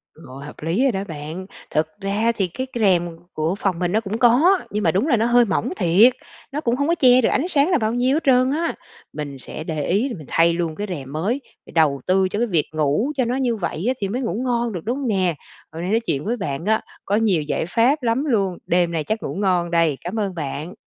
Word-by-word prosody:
Rồi, 140 -2 -11
hợp 150 - -10
lý 170 - 0
rồi 270 - +3
đó 195 -2 -3
bạn. 160 +4 -6 0.3
Thực 155 +1 +1
ra 205 +4 +1
thì 195 -5 -1
cái 260 +10 -5
c - - -33
rèm 180 -5 +3 0.2
của 160 +4 -1
phòng 195 -4 -1
mình 175 -1 0
nó 215 - +2
cũng 215 0 -4
có, 280 +12 +5
nhưng 210 0 -2
mà 165 - +3
đúng 200 - +1
là 240 - +3
nó 220 - +1
hơi 240 0 +5
mỏng 195 - -1
thiệt, 200 +7 +5 0.4
nó 295 +3 -3
cũng 235 -5 +1
hông 285 +3 0
có 340 - +2
che 255 -4 +5
được - - +2
ánh 300 +7 0
sáng 300 -1 +2
là 355 - +4
bao 220 -2 -1
nhiêu 250 +3 +2
hết 320 - -1
trơn 255 -1 +4
á. 330 +3 -1 0.4
Mình 145 -3 -6
sẽ 155 - -7
để 155 -2 -3
ý 210 +9 +1
rồi 235 - -5
mình 150 -4 -11
thay 165 +1 +3
luôn 165 -2 -2
cái 205 +3 -4
rèm 140 -6 -6
mới, 205 - -1 0.2
phải - - -14
đầu 150 -5 +2
tư 190 +1 +3
cho 205 - -2
cái 240 - +1
việc 165 -7 +1
ngủ 155 - +1
cho 255 - +2
nó 245 +2 -1
như 250 -3 0
vậy 180 -2 -4
á 255 - +3
thì 195 - 0
mới 250 +5 -2
ngủ 230 - -2
ngon 240 -3 0
được, 175 - -4
đúng 245 +4 -1
hông 275 -3 -3
nè? 185 -6 +1 0.4
Hôm 165 +1 -7
nay 180 - -2
nói 225 - +3
chuyện 150 -11 -3
với 240 +4 -1
bạn 165 -5 -4
á, 220 +1 +2 0.2
có 200 - +1
nhiều 210 -7 +2
giải 150 +1 -2
pháp 245 - +2
lắm 240 +5 +1
luôn, 200 - 0
đêm 175 -1 +2
nay 160 -2 -1
chắc 220 +8 -3
ngủ - - -4
ngon 180 -3 +1
đây. 165 -5 +2
Cám 195 +6 -4
ơn 195 -3 -2
bạn. 150 +3 -5
200 Hz, 265 wpm, -21 LUFS, 165-240 Hz, 0.4 s, có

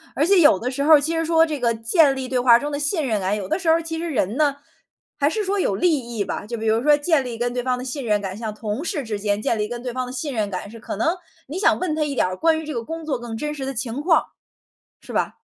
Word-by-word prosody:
而 295 - +2
且 385 +2 +5
有 310 -1 +6
的 250 +2 -3
时 280 +2 -2
候 315 +2 +6
儿 - - +6
其 320 +3 -1
实 325 - 0
说 325 0 +4
这 305 -3 -4
个 235 -2 +2
建 270 +6 +3
立 265 -1 -4
对 255 -1 0
话 245 -1 +6
中 290 +4 -4
的 285 - -2
信 295 +1 0
任 215 -4 0
感， 190 +3 0
有 195 -3 -5
的 - - -1
时 345 -3 0
候 320 - +6
儿， 335 - -1
其 325 0 -4
实 340 +1 -3
人 220 - 0
呢， 295 -2 +2 0.6
还 285 - +3
是 430 +6 -2
说 400 +1 0
有 200 - +1
利 335 - +2
益 235 -4 -4
吧， - - -4
就 235 +1 -4
比 220 - -5
如 220 +1 +2
说 295 +2 +5
建 290 -1 +2
立 240 -2 -6
跟 240 +1 -1
对 250 - -1
方 255 0 0
的 250 - -6
信 265 +2 -4
任 210 -3 +1
感， 190 -2 -5
像 220 0 -5
同 215 +5 -4
事 305 -4 -2
之 215 -3 -4
间 205 0 0
建 225 +1 0
立 210 0 -1
跟 240 +1 -6
对 250 -2 -4
方 255 0 -2
的 - - -7
信 270 +3 -4
任 215 -4 -1
感， 190 +1 -5
是 230 +2 -11
可 225 - -6
能 320 - +1 0.3
你 310 +7 -5
想 410 - +3
问 360 -4 -1
他 310 - 0
一 290 -2 -3
点 - - +2
儿 185 0 -3
关 320 - +2
于 320 - -7
这 305 - -5
个 235 - -3
工 325 +5 -6
作 275 -5 -2
更 235 -2 -6
真 300 +4 -3
实 275 -3 -5
的 270 - -3
情 240 +2 -3
况， 325 0 +3 0.8
是 - - -11
吧？ - - -1
260 Hz, 340 characters per minute, -22 LUFS, 225-315 Hz, 0.8 s, 有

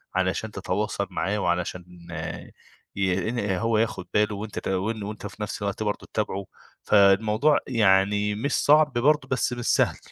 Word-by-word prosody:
علشان 95 +4 -1
تتواصل 100 +1 -2
معاه 95 +3 -1
وعلشان 90 -1 -3
آآ - - -6 0.4
ي 95 +1 0
إن 120 +1 -2 0.2
هو 115 +2 +1
ياخد 110 -5 -1
باله 105 0 +2
وأنت 105 +1 -5
ت - - -7
وأنت 105 +2 -3
في 100 +1 -12
نفس 105 - -5
الوقت 100 +1 -2
برضه 105 -1 -3
تتابعه، 100 -2 -2 0.4
فالموضوع 105 +8 +4
يعني 105 -3 +3
مش 130 +6 -2
صعب 150 -1 +4
برضه، 135 +3 +2
بس 130 -1 0
مش 120 -1 -5
سهل. - - +2
105 Hz, 155 wpm, -25 LUFS, 95-115 Hz, 0.4 s, فالموضوع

